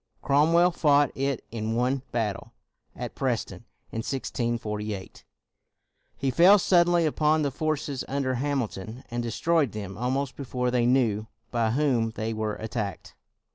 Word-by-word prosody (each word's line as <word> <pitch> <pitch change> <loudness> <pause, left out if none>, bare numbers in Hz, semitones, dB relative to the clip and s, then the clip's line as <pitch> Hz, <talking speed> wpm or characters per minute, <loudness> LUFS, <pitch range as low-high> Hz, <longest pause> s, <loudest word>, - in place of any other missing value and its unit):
Crom 145 +3 +3
well 175 +1 +5
fought 145 -4 +3
it 135 -2 -2
in 110 0 -2
one 125 +3 +1
battle. 110 -4 -2 0.4
At - - -6
Preston, - - -2 0.3
in - - -5
1648, 110 -5 -3 0.9
he 135 -1 0
fell 180 +9 +7
suddenly 175 -2 +4
upon 155 0 +2
the 140 - 0
forces 145 -2 -2
under 135 -1 -1
Hamilton 125 -4 -3
and 120 0 -1
destroyed 140 +4 +1
them 100 -2 -6
al 125 +1 0
most 135 +1 -1
before 125 -2 -2
they 120 -1 +2
knew 115 -5 +2 0.2
by 115 -2 +1
whom 125 -3 +1
they 110 0 -2
were 110 -1 -2
attacked. 110 -5 -5
125 Hz, 140 wpm, -27 LUFS, 115-145 Hz, 0.9 s, fell